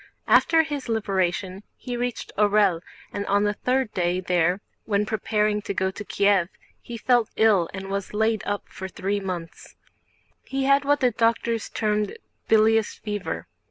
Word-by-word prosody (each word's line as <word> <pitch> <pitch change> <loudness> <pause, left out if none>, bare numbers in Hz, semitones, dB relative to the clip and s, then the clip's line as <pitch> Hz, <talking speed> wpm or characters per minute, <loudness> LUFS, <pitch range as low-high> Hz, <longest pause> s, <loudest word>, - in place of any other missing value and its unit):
After 325 -1 +5
his 290 -5 -5
liberation 195 -3 -1 0.2
he 245 -1 -5
reached 245 0 -3
Orël, 205 -4 +3 0.3
and 200 - -2
on 205 +1 +2
the 205 0 +1
third 250 +1 -1
day 180 0 0
there, 180 0 +1 0.3
when 205 -1 +1
preparing 210 0 0
to 200 - -4
go 190 0 0
to 210 - -7
Kiev, 200 -3 +2 0.3
he 235 - -7
fell 240 -1 +2
ill 205 -6 +3
and 195 0 -7
was 195 0 -3
laid 220 0 +1
up 205 0 -3
for 190 - -7
three 195 +2 -2
months. 180 -4 -7 0.7
He 270 0 -3
had 275 +1 +3
what 290 +1 +2
the 250 -1 +4
doctors 230 0 0
termed 210 -2 -1 0.3
"bilious 220 0 +3
fever." 205 -2 -4
210 Hz, 160 wpm, -24 LUFS, 195-230 Hz, 0.7 s, After